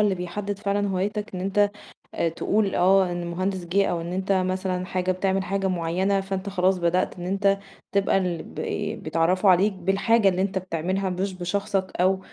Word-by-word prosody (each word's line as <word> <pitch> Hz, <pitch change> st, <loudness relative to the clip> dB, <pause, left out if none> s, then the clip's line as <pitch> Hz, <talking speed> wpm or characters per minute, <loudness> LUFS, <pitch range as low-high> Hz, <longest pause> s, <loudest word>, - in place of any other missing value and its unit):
اللي 205 Hz, -2 st, +3 dB
بيحدّد 195 Hz, +3 st, -4 dB
فعلًا 200 Hz, 0 st, 0 dB
هوايتك 205 Hz, +2 st, -2 dB
إن 180 Hz, -, -4 dB
أنت 200 Hz, +2 st, +2 dB, 0.5 s
آآ 165 Hz, -, +1 dB
تقول 200 Hz, +4 st, 0 dB
آه 190 Hz, 0 st, +4 dB
إن 175 Hz, 0 st, -3 dB
المهندس 180 Hz, +1 st, -2 dB
جِه 195 Hz, +3 st, +2 dB
أو 170 Hz, -1 st, -1 dB
إن 170 Hz, +2 st, -5 dB
أنت 190 Hz, +1 st, -1 dB
مثلًا 185 Hz, -1 st, 0 dB
حاجة 185 Hz, -1 st, -1 dB
بتعمل 190 Hz, +1 st, 0 dB
حاجة 195 Hz, 0 st, -1 dB
معيّنة، 185 Hz, +3 st, 0 dB
فأنت 195 Hz, +1 st, -4 dB
خلاص 185 Hz, 0 st, +2 dB
بدأت 175 Hz, +1 st, 0 dB
إن 175 Hz, -, -5 dB
أنت 195 Hz, +1 st, +2 dB, 0.3 s
تبقى 200 Hz, -1 st, +2 dB
البي 195 Hz, +4 st, -3 dB
بيتعرّفوا 165 Hz, +5 st, +1 dB
عليك 195 Hz, +3 st, +4 dB
بالحاجة 195 Hz, +3 st, +2 dB
اللي 185 Hz, 0 st, 0 dB
أنت 195 Hz, -1 st, -1 dB
بتعملها، 185 Hz, +2 st, -2 dB
مش 190 Hz, +2 st, -2 dB
بشخصك 190 Hz, +1 st, -2 dB
أو 190 Hz, +1 st, +3 dB
190 Hz, 175 wpm, -25 LUFS, 180-195 Hz, 0.5 s, آه